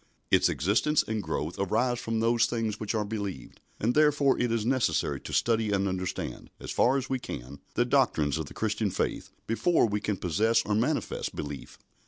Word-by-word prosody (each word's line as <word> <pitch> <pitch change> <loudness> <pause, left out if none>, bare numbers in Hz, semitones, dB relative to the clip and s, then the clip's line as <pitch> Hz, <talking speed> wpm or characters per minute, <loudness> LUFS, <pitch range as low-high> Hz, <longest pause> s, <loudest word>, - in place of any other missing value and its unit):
Its - - +5
existence 110 - +2
and 110 -1 -1
growth 80 -1 -3
arise 120 +5 +1
from 115 0 -2
those 115 +1 +3
things 110 -3 -2
which 110 +1 -2
are 105 -1 0
believed, 100 - -6 0.2
and 115 +3 +1
therefore 145 -2 +4
it 120 -1 +1
is 115 -2 0
necessary 130 0 +1
to - - -8
study 115 -2 +2
and 100 -1 +1
understand, 95 -1 -4
as - - -6
far 130 +3 +3
as 135 -1 -3
we 130 -1 -1
can, 65 - -7 0.2
the 120 - +3
doctrines 80 - +2
of 80 - -4
the - - -11
Christian 110 -1 0
faith - - -2 0.2
before 160 +9 +2
we 105 -2 -1
can 105 -1 -1
possess 105 +7 +2
or 105 - 0
manifest 125 +9 -1
belief. 70 -2 -6
110 Hz, 190 wpm, -28 LUFS, 100-120 Hz, 0.2 s, Its